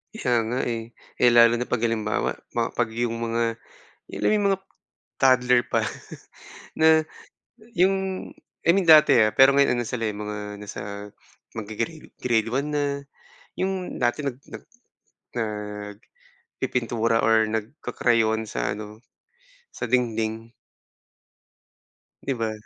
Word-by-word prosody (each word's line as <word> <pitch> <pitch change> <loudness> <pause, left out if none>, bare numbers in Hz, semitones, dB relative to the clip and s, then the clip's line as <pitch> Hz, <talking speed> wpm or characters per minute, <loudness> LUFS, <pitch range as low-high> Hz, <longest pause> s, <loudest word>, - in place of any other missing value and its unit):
Kaya 125 - +1
nga, 125 +3 -1
eh, 115 -1 -4 0.2
eh, 125 - +6
lalo 115 0 +6
na 125 - -3
'pag 120 -2 -1
halimbawa 110 -2 0 0.2
ma 115 -1 0
'pag 120 - 0
yung 115 -1 -1
mga 115 0 -1 0.5
yun - - -5
lang, - - +2
yung 205 -1 +1
mga 195 - -1 0.6
toddler 125 -2 +5
pa - - +1 0.9
na 160 0 +4 0.7
yung 190 +2 +5 0.7
I 170 - +6
mean 195 - +3
dati, 150 -3 +8
ah, 110 - +3
pero 135 +4 +6
ngayon 140 -3 +3
ano 120 - -2
sila, 115 +1 -4
eh, - - -7
mga 105 0 -6
nasa 100 0 -7 0.5
maggre-grade 115 +8 -5
grade 115 -3 0
1 135 +4 -1
na, 145 - +1 0.8
yung 190 -1 -2
dati 120 +5 0
nag 135 -3 -3
nag - - -10 1.8
nagpipintura 115 - -1
or 110 0 +4
nagka-crayon 110 -1 0
sa 105 -1 -3
ano, 105 +1 -9 0.7
sa 120 - -5
dingding. 115 -2 -1 1.7
'Di 135 - -1
ba? 115 -2 -2
115 Hz, 125 wpm, -24 LUFS, 110-130 Hz, 1.8 s, dati